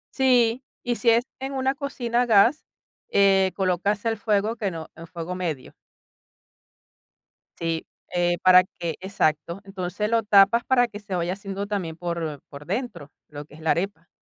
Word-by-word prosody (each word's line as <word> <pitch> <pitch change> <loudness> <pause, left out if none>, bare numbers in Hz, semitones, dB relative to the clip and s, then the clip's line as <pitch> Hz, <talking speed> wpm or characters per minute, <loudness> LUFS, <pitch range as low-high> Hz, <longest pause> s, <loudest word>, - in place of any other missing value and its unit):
Sí, 250 -2 +3 0.2
y 240 -1 -1
si 240 - +2
es 230 +1 +4 0.2
en 270 +1 -5
una 265 0 0
cocina 250 -4 -2
a - - +2
gas, 230 +7 +4 0.5
eh, 195 -1 +4
colocas 195 +3 0
el 225 -1 +1
fuego 210 +2 0
que 210 -3 -1
no 165 -3 -8
en 165 +1 -11
fuego 170 0 -6
medio. 165 -8 -4 1.9
Sí, 165 -1 -2 0.3
eh, 175 0 +2
para 185 0 +7
que 170 -3 -6
exacto. 170 -2 -1
Entonces, 195 +1 -4
lo 230 0 +2
tapas 205 +3 +5
para 245 -2 +3
que 210 -3 -9
se 205 -3 -5
vaya 175 0 -1
haciendo 195 +1 -5
también 190 -6 -3
por 165 -4 -4
por 145 0 -11
dentro, 190 - -4 0.2
lo 145 0 -9
que 145 - -20
es 160 - -14
la 160 - +1
arepa. 170 -2 -2
195 Hz, 170 wpm, -24 LUFS, 170-230 Hz, 1.9 s, para